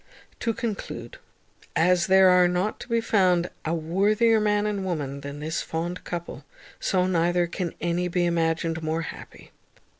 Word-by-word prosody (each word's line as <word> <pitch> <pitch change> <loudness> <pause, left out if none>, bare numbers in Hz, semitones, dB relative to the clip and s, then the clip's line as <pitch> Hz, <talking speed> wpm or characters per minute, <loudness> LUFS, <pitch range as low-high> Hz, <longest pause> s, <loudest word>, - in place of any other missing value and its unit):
To 230 - 0
conclude, 205 - -5 0.6
as 175 +1 +3
there 190 0 +6
are 180 -1 +5
not 180 +4 -1
to - - -9
be 230 -1 +1
found 185 -5 +2
a 160 +1 -1
worthier 205 +8 +2
man 210 0 +1
and 205 -2 -2
woman, 145 -7 -3
than 140 +1 -7
this 160 +1 -2
fond 170 +2 -4
couple, 170 -1 -6 0.4
so 185 -2 +1
neither 175 -1 +2
can 170 0 -4
any 175 +1 0
be 180 0 0
imagined 165 -1 0
more 160 +1 -1
happy. - - -10
175 Hz, 155 wpm, -25 LUFS, 165-190 Hz, 0.6 s, there